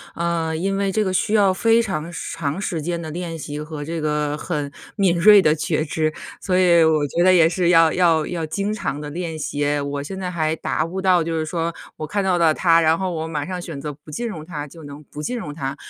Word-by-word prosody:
呃， 170 -1 -1
因 195 +4 -1
为 200 -1 0
这 215 +2 +1
个 190 - -1
需 210 +3 0
要 200 -3 +5
非 225 +4 +3
常 170 -7 -3
长 165 +1 -4
时 170 -4 -2
间 170 +2 -3
的 160 - -6
练 165 0 -5
习 150 -1 -6
和 150 -1 -6
这 165 +2 -4
个 150 -1 -1
很 150 -4 -3 0.2
敏 190 -4 +2
锐 205 +3 +8
的 155 -4 +3
觉 155 0 -1
知， 155 0 -1 0.3
所 185 - -1
以 170 -3 +5
我 155 -2 +3
觉 170 +5 0
得 185 0 +6
也 165 -2 +5
是 175 0 +1
要 165 -2 +6
要 165 -3 +2
要 170 -2 -3
经 200 +6 -2
常 150 -9 -3
地 150 - -6
练 165 0 -4
习， 145 -1 -1
我 140 0 -3
现 190 +6 -6
在 185 - -3
还 160 -3 -1
达 160 - -1
不 185 +3 -4
到， 185 -3 +3
就 165 0 -3
是 155 - -1
说 165 +1 -2 0.2
我 155 - -4
看 200 +6 -1
到 185 -2 +2
了 165 -2 +4
它， 165 0 +4
然 160 0 +3
后 190 -1 -2
我 160 -1 -3
马 150 -2 -3
上 185 -1 -4
选 160 -5 -7
择 150 - -4
不 150 +1 -14
进 235 +9 -3
入 165 -8 -7
它 150 -4 -6
就 160 +2 -13
能 145 +1 -10
不 150 - -9
进 250 +7 -2
入 155 -10 -5
它。 140 -2 -4
165 Hz, 270 characters per minute, -21 LUFS, 150-180 Hz, 0.3 s, 锐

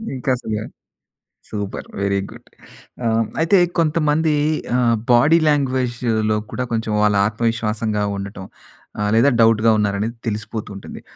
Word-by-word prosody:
ఇంకా 130 +1 -4
అసలు 110 -3 -4 0.9
super! 105 -2 -5
Very 100 0 +1
good. - - -14 0.6
ఆ! - - +1 0.3
అయితే 165 +5 +4 0.2
కొంతమంది 155 -1 +2 0.4
ఆహ్, 120 -2 +3 0.2
బాడీ 150 +8 +5
లాంగ్వేజ్‌లో 125 -6 0
కూడా 125 - -2
కొంచెం 110 -1 -1
వాళ్ళ 105 -1 +3
ఆత్మవిశ్వాసంగా 110 -1 -1
ఉండటం, 100 -1 -7 0.5
ఆహ్, 105 0 0
లేదా 120 +5 +5
డౌట్‌గా 115 0 +4
ఉన్నారనేది 105 +2 -1
తెలిసిపోతూ 105 0 -4
ఉంటుంది. 100 - -9
115 Hz, 120 wpm, -20 LUFS, 105-125 Hz, 0.9 s, బాడీ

